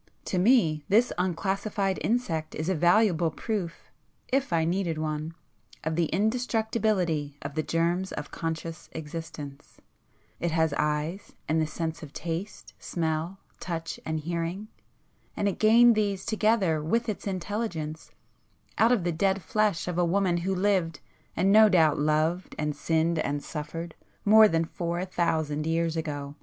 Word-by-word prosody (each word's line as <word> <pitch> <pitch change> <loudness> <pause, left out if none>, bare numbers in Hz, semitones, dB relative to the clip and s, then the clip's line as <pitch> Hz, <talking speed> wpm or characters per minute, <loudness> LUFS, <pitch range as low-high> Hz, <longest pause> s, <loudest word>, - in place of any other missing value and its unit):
To 185 - -1
me, 180 - +3
this 225 +5 +4
unclassified 195 +2 -1
insect 195 -10 -1
is 155 +3 -2
a - - +2
valuable 175 0 +3
proof 185 -1 -4 0.4
(if 270 -5 +1
I 165 -1 +2
needed 170 -1 -1
one) 155 +1 -3 0.5
of 160 0 -1
the 170 -1 +2
indestructibility 215 - 0
of 140 0 -5
the 155 - 0
germs 170 +4 0
of 150 0 -6
conscious 165 0 -5
existence; 150 -2 -8 0.6
it 170 - 0
has 160 -2 +1
eyes, 150 +6 -2
and 160 +1 +2
the 155 - 0
senses 160 +1 -4
of 150 -3 -10
taste, 170 +5 -5
smell, 165 +2 -2 0.2
touch 165 -2 -4
and 160 -1 -2
hearing,—and 175 +5 -6
it 200 - -2
gained 235 +2 +7
these 205 -3 -1
together 215 -7 +2
with 230 +9 0
its 210 -1 -4
intelligence, 185 -5 -4 0.7
out 225 +2 +5
of 235 -8 +2
the 175 - 0
dead 190 +3 0
flesh 210 -3 0
of 180 0 -1
a - - +4
woman 180 0 +2
who 190 +3 -1
lived, 180 -5 +1 0.4
and 195 +2 +3
no 215 +1 +8
doubt 160 -6 +4
loved 155 +4 0
and 150 -1 -1
sinned 165 0 +1
and 145 -1 -2
suffered 160 +3 -6 0.3
more 215 +1 +8
than 165 -3 +1
four 170 +2 -3
thousand 160 -4 -1
years 165 0 0
ago!" 145 -3 -4
170 Hz, 150 wpm, -27 LUFS, 160-200 Hz, 0.7 s, no